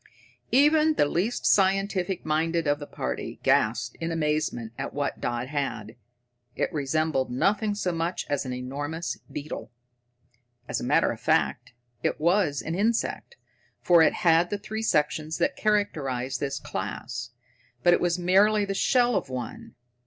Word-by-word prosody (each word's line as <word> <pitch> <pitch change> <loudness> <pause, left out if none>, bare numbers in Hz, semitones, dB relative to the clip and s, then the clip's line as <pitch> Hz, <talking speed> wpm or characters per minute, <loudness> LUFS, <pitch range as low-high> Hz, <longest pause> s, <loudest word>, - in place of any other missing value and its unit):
Even 305 +4 +4
the - - +3
least 185 +11 -1
scientific 195 -1 +2
minded 165 +2 0
of 145 0 +1
the 145 - -7
party 65 0 -5
gasped 120 +3 +1
in 165 0 -2
amazement 150 -8 -1
at 135 - -5
what 145 -1 -2
Dodd 120 +1 -2
had. 135 -7 -3 0.6
It - - -1
resembled 150 -2 0
nothing 205 - +1
so 185 -3 -1
much 170 +1 -2
as 145 -1 -1
an 130 - -5
enormous 145 +6 -4
beetle. 150 +1 -6 1.0
As - - -2
a - - -5
matter - - +3
of - - -7
fact, - - +1 0.3
it - - -1
was 165 -3 +2
an 160 - -3
insect, 225 - -1 0.5
for 175 -2 +6
it 160 - +5
had 165 +1 +5
the 205 - -2
three 215 +2 -5
sections 155 -5 0
that 275 - +1
characterize 135 - -1
this 140 -1 -2
class, 120 +5 -5 0.5
but 175 - +6
it - - +2
was 175 0 +1
merely 200 +4 +4
the 195 - -2
shell 245 +3 +3
of - - -1
one. 125 -3 -6
160 Hz, 150 wpm, -26 LUFS, 135-195 Hz, 1.0 s, for